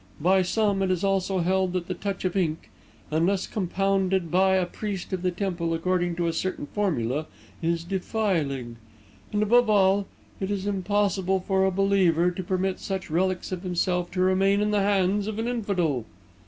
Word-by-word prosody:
By 185 +5 +4
some, 200 +1 +1
it 190 - +1
is 185 0 0
also 195 -1 +1
held 185 +1 +1
that 180 -2 -2
the 185 - -3
touch 195 +1 -4
of 185 - -1
ink, 165 -5 -1 0.4
unless 180 +5 +1
compounded 190 -2 0
by 190 +1 +4
a 185 -1 +2
priest 195 0 -5
of 185 - -2
the 180 - +1
temple 175 -3 -2
according 175 +1 0
to 170 0 -1
a 165 - 0
certain 185 -2 -2
formula, 150 - -1 0.3
is 165 0 0
defiling; 170 - -2 0.5
and, 210 0 +1
above 240 +2 +4
all, 195 -1 +3 0.3
it 190 - -2
is 200 -1 -2
impossible 195 -1 0
for 190 +1 +1
a 190 - +2
believer 180 -3 +3
to 180 - -5
permit 185 +1 -1
such 190 -4 -4
relics 185 +3 0
of 185 -2 -3
himself 180 -1 -1
to 185 - 0
remain 190 +2 +3
in 210 0 +1
the 205 -1 +2
hands 200 0 +1
of 215 -1 -4
an 225 +1 -2
infidel." 185 - 0
190 Hz, 180 wpm, -26 LUFS, 175-195 Hz, 0.5 s, By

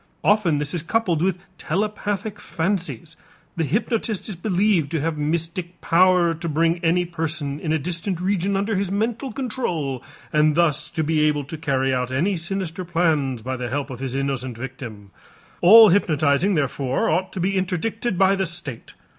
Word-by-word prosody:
Often 200 -7 +3
this 145 0 -2
is 175 - -1
coupled 175 -2 0
with 185 0 +1 0.2
telepathic 205 +2 -2
fancies. 170 -2 -3 0.4
The 165 - 0
hypnotist 215 - -1
is 210 - -5
believed 185 -3 +1
to 165 - +1
have 165 +1 -1
mystic 170 +4 -2
power 175 0 +4
to 165 +1 -4
bring 165 +3 +1
any 175 +2 +2
person 160 -4 -3
in 155 - -3
a 160 - +3
distant 170 +3 -3
region 195 +1 0
under 205 +2 -1
his 195 -1 -1
mental 230 +6 -1
control 180 - -3 0.3
and 150 0 +3
thus 170 -4 +2
to 160 - -2
be 155 0 +1
able 150 -1 +1
to 140 +4 -7
carry 135 -4 0
out 125 0 -1
any 170 +10 +1
sinister 180 0 -3
plans 155 -8 0
by 130 +2 -3
the 125 -1 -4
help 140 +2 -3
of 125 - -7
his 135 -1 -4
innocent 135 -3 -2
victim. 120 -6 -8 0.5
All 220 +4 +9
hypnotizing 160 0 +2
therefore 135 -3 0
ought 185 +4 0
to - - -5
be 190 +3 0
interdicted 190 +3 -1
by 190 +1 +4
the 190 -2 -1
state. 155 -8 -5
170 Hz, 170 wpm, -22 LUFS, 145-190 Hz, 0.5 s, All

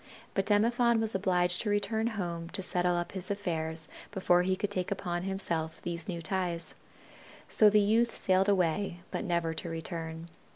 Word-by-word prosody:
But 195 0 0
Demophon 235 +3 +4
was 220 0 -1
obliged 180 -2 +2
to 215 - -2
return 220 +2 +1
home 170 -3 -3
to 190 - -2
settle 180 -1 +1
up 175 0 -2
his 190 -2 -6
affairs 160 -5 -2 0.2
before 180 -3 +3
he 185 +1 +1
could 205 +2 -2
take 185 -3 -2
upon 175 -3 -2
himself 170 -4 -2
these 170 -1 -3
new 170 -2 -4
ties. 175 0 -1 0.7
So 215 - +6
the 210 +1 +5
youth 225 +3 +3
sailed 190 +1 +3
away, 180 -1 +1
but - - -2
never 170 -4 0
to 170 - -5
return. 165 0 -5
180 Hz, 170 wpm, -31 LUFS, 170-205 Hz, 0.7 s, So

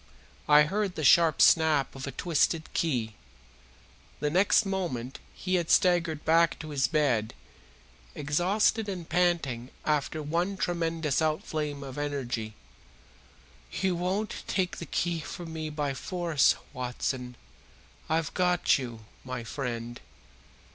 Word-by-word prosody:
I 150 0 +8
heard 195 +3 -1
the 155 - -4
sharp 160 +2 +6
snap 155 -4 +4
of 135 0 -7
a - - -3
twisted 165 0 0
key. 120 -9 -1 1.1
The 150 0 -1
next 195 +5 +4
moment 170 -11 -3 0.2
he 185 - -3
had 165 - -8
staggered 170 -4 +3
back 165 +1 +4
to 155 - -8
his 140 -3 +1
bed, 130 -9 +1 0.8
exhausted 195 +8 +1
and 180 -4 -5
panting 160 -9 0 0.2
after 150 +1 0
his - - -8
one 180 +4 0
tremendous 165 -4 -1
outflame 155 -2 -2
of 135 0 -7
energy. 125 -7 -3 1.2
"You 190 -2 0
won't 185 +5 -2
take 185 -2 -1
the 170 - -7
key 170 +2 -1
from 165 +1 -7
me 155 -1 -4
by 150 -2 -2
force, 170 +1 +1 0.2
Watson, 125 0 -3 0.7
I've 160 -1 0
got 180 -4 +2
you, 115 -4 -7 0.2
my 130 -2 -5
friend. 120 -1 -5
155 Hz, 125 wpm, -28 LUFS, 135-175 Hz, 1.2 s, I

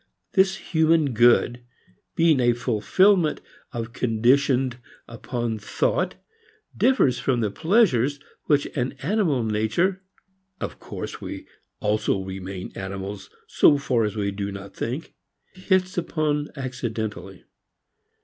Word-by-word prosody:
This 190 -1 +4
human 160 -4 +2
good, 120 +1 +4 0.5
being 165 -4 +4
a 120 -1 +4
fulfilment 150 - +2 0.5
conditioned 125 +2 +2 0.3
upon 115 -1 -4
thought, - - -1 0.6
differs 140 - +3
from 125 -2 0
the 105 -3 0
pleasures 145 - +2 0.3
which 145 -2 +3
an 125 -1 -1
animal 165 - +1
nature 110 - 0 0.6
of - - -5
course - - -7
we - - -7 0.4
also 105 -1 +1
remain 95 0 -6
animals 95 0 -6 0.2
so 145 - +4
far 130 -4 +1
as 105 -1 -2
we 100 -2 -1
do 100 0 -4
not 100 0 -9
think 130 +8 -4 0.4
hits 185 -1 0
upon 155 -3 -1
accidentally. 110 - -5
125 Hz, 110 wpm, -24 LUFS, 110-160 Hz, 0.6 s, This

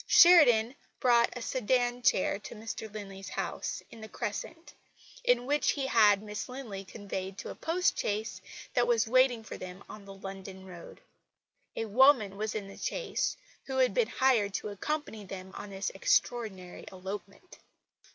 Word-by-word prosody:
Sheridan 255 -10 +7 0.3
brought 235 -2 +4
a 245 - -6
sedan 245 0 0
chair 200 -3 +2
to 220 - -9
Mr 220 0 -6
Linley's 195 -2 -8
house - - -4
in 225 - -12
the 220 - -9
Crescent, 325 +13 -5 0.5
in 245 0 +3
which 290 +2 +2
he 275 -2 -2
had 210 -5 +5
Miss 210 +3 -5
Linley 235 -7 -6
conveyed 190 -1 -6
to - - -6
a - - -9
post 355 +3 0
chaise 210 -2 -2 0.3
that 245 -1 +2
was 235 -2 +3
waiting 250 -1 +3
for - - -8
them 185 +1 -9
on 210 -2 -11
the 195 - -10
London 195 0 -9
road. 180 - -11 0.7
A 225 - -2
woman 225 -2 +5
was 215 +2 -3
in 205 -2 -4
the 195 - -11
chaise - - -2 0.3
who 265 -1 -4
had 255 -1 +3
been 485 -3 +2
hired 225 -7 +2
to 210 - -3
accompany 220 +1 -4
them 190 -1 -8
on 205 - -8
this 195 -1 -3
extraordinary 195 -3 -1
elopement." 195 - -8
220 Hz, 160 wpm, -30 LUFS, 195-250 Hz, 0.7 s, Sheridan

